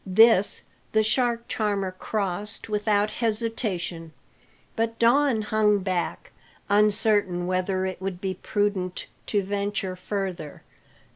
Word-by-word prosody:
This 205 +1 +4 0.3
the 220 0 +4
shark 235 +1 0
charmer 200 -3 -1
crossed 200 +1 -3
without 210 0 +1
hesitation, 210 -8 -2 0.6
but 230 0 -1
Don 240 -1 +3
hung 210 -1 +3
back, 185 -2 -2 0.4
uncertain 205 -3 +3
whether 185 +1 0
it 185 -1 -4
would 190 -2 -4
be 190 0 -2
prudent 200 -3 -1 0.2
to 205 -2 +1
venture 200 -1 -2
further. 185 -5 -5
205 Hz, 110 wpm, -25 LUFS, 185-220 Hz, 0.6 s, This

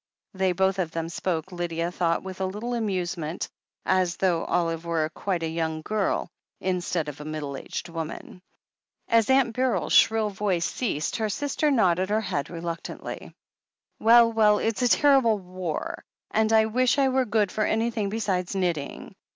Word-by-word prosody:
They 190 -1 +1
both 190 +2 +1
of 175 -3 0
them 165 0 -4
spoke, 170 0 -3
Lydia 170 -1 -2
thought 170 -2 0
with 190 0 -7
a - - +1
little 215 +6 -4
amusement, 180 -7 -2 0.4
as 185 -2 +2
though 175 -3 +1
Olive 165 -2 0
were 165 -2 0
quite 185 -4 -2
a - - 0
young 160 -1 -2
girl, 210 0 0 0.3
instead 180 -3 -1
of 150 0 -7
a - - -6
middle 150 -2 -5
aged 135 - -6
woman. 165 +2 -7 0.7
As 230 0 +3
Aunt 265 -4 +3
Beryl's 255 -1 0
shrill 220 -2 +4
voice 190 -3 0
ceased, 185 - -2
her 220 -1 -1
sister 290 +6 0
nodded 190 -8 +2
her 215 +1 +2
head 145 -9 -3
reluctantly. 170 -1 -6 0.6
"Well, 230 0 +6
well, 210 -2 +5
it's 225 +3 -1
a 250 - +4
terrible 265 -5 +4
war, 180 -4 -5 0.3
and 220 0 +2
I 220 0 +5
wish 250 +4 +2
I 270 -1 +4
were 260 0 +2
good 210 -3 +1
for 215 - 0
anything 220 -1 0
besides 195 -4 -1
knitting. 175 -7 -2
190 Hz, 165 wpm, -26 LUFS, 170-220 Hz, 0.7 s, Well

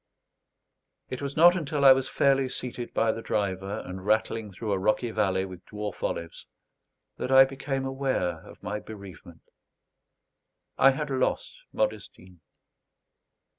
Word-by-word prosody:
It 130 - -5
was 140 +1 -5
not 175 +3 +7
until 150 -4 -1
I 135 - +11
was 130 0 -2
fairly 135 -1 +2
seated 125 -1 -5
by 115 0 +2
the 115 - -6
driver, 100 -2 -2
and 90 0 -7
rattling 110 +1 0
through 105 +3 -5
a 95 - +1
rocky 110 +4 +1
valley 95 -3 +1
with 95 -2 -10
dwarf 105 -1 -6
olives, 85 -1 -4 0.7
that - - -3
I 135 0 +8
became 135 0 -4
aware 130 - -1
of - - -15
my 105 +1 -3
bereavement. 95 -6 -12 1.3
I 135 - +6
had 140 +2 -2
lost 130 -1 -1 0.2
Modestine. 95 - -4
115 Hz, 135 wpm, -27 LUFS, 95-135 Hz, 1.3 s, I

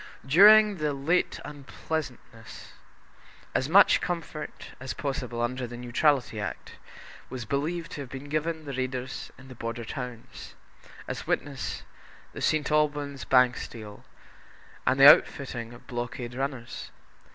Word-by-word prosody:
During 205 +7 +7
the 150 -2 -1
late 150 +6 0
unpleasantness, 140 -5 -7 0.8
as 130 - 0
much 195 +5 +6
comfort 165 -3 -5
as 130 +1 -5
possible 125 -4 -3
under 125 +1 -2
the 120 +1 -8
Neutrality 125 -1 +1
Act - - -6 0.5
was 125 -3 -6
believed 160 +7 -2
to 145 - -6
have 135 - -8
been 135 +2 -8
given 155 +2 -2
the 140 - -5
raiders 130 0 -4
into 130 +1 -14
the - - -9
border 115 0 -5
towns, 125 -1 -8 0.5
as - - -5
witness 140 -1 -2 0.5
the - - -7
St. 155 -1 +1
Alban's 145 -2 0
Bank 125 -1 +4
steal 105 -3 -9 0.8
and 130 +1 +3
the 135 - +10
outfitting 130 -5 +4
of 120 - -14
blockade 120 0 -5
runners. 130 -2 -5
135 Hz, 130 wpm, -27 LUFS, 120-150 Hz, 0.8 s, the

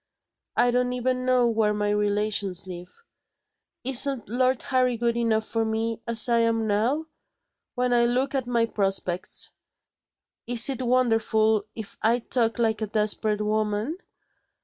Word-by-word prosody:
I 245 - +4
don't 250 0 0
even 255 0 -1
know 255 -1 +3
where 220 -2 +1
my 205 0 -1
relations 205 -2 -1
live. 180 - -11 0.8
Isn't 265 -1 +2
Lord 255 +3 0
Harry 255 -2 +1
good 235 0 0
enough 225 -2 0
for 225 0 -1
me, 225 +1 -2
as 230 -1 +5
I 235 -1 +2
am 230 -1 +1
now? 230 +9 0 0.7
When 250 -1 0
I 240 0 +3
look 255 +3 0
at 265 -3 -2
my 235 -2 +1
prospects, 195 -4 -2 1.0
is 235 +1 +4
it 260 - -4
wonderful 225 -4 +1
if 220 -3 -9
I 225 +2 +3
talk 230 -1 0
like 225 -2 0
a 215 - -1
desperate 210 0 0
woman? 215 - -1
230 Hz, 145 wpm, -25 LUFS, 215-245 Hz, 1.0 s, as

